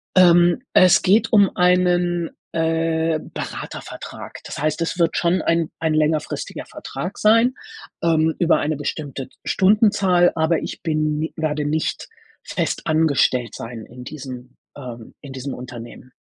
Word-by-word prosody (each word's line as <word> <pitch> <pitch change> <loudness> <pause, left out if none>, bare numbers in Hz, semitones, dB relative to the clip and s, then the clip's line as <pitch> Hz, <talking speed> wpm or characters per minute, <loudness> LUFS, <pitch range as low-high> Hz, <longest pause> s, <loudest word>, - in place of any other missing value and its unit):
Ähm, 175 +3 +5
es 185 -1 +6
geht 210 +4 +3
um 200 -3 +4
einen, 180 -1 +2 0.2
äh, 165 0 0
Beratervertrag. - - -7
Das - - -7
heißt, 155 +2 -1
es 180 +2 -2
wird 165 -1 +2
schon 175 +2 +1
ein 165 -1 0
ein 160 -1 0
längerfristiger 155 0 -1
Vertrag 180 - -7
sein, 230 +4 +4 0.5
ähm, 160 -1 +2
über 175 -1 +3
eine 155 +1 -1
bestimmte 140 -2 -5 0.2
Stundenzahl, 190 -3 +3
aber 160 0 +2
ich - - -7
bin 155 -2 0
ni 160 - -3
werde 150 -1 -1
nicht 155 - -2 0.3
fest - - -2
angestellt 140 -7 +2
sein 115 -1 -7
in 125 +1 -12
diesem 130 -3 -9 0.2
ähm, 120 -4 -9
in 140 -2 -10
diesem 135 +1 -5
Unternehmen. 125 0 -10
160 Hz, 135 wpm, -21 LUFS, 145-175 Hz, 0.5 s, es